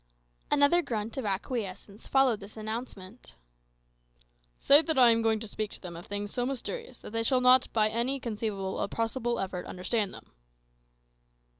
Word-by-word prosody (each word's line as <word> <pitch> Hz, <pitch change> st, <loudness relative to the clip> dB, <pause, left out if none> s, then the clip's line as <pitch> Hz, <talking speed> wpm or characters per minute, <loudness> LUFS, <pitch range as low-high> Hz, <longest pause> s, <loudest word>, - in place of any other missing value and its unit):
Another 295 Hz, +4 st, +4 dB
grunt 225 Hz, -6 st, -4 dB
of 260 Hz, -, -3 dB
acquiescence 200 Hz, 0 st, -4 dB
followed 265 Hz, -5 st, +3 dB
this 205 Hz, +2 st, -12 dB
announcement. 220 Hz, -1 st, -7 dB, 1.2 s
"Say 285 Hz, +2 st, +7 dB
that 320 Hz, -2 st, 0 dB
I 245 Hz, -2 st, +7 dB
am 230 Hz, 0 st, +2 dB
going 225 Hz, -1 st, +2 dB
to 225 Hz, -, -5 dB
speak 215 Hz, 0 st, -4 dB
to -, -, -7 dB
them 175 Hz, -2 st, -8 dB
of 170 Hz, -, -10 dB
things 205 Hz, 0 st, -5 dB
so 245 Hz, -, -1 dB
mysterious 275 Hz, -, -5 dB
that -, -, -11 dB
they 225 Hz, +1 st, -1 dB
shall 255 Hz, +3 st, +3 dB
not 250 Hz, 0 st, +5 dB
by 215 Hz, -1 st, +3 dB
any 235 Hz, +5 st, 0 dB
conceivable 210 Hz, -5 st, -3 dB
or -, -, 0 dB
possible 235 Hz, +2 st, -2 dB
effort 185 Hz, -2 st, -4 dB
understand 195 Hz, +3 st, -1 dB
them." -, -, -13 dB
225 Hz, 165 wpm, -29 LUFS, 205-255 Hz, 1.2 s, Say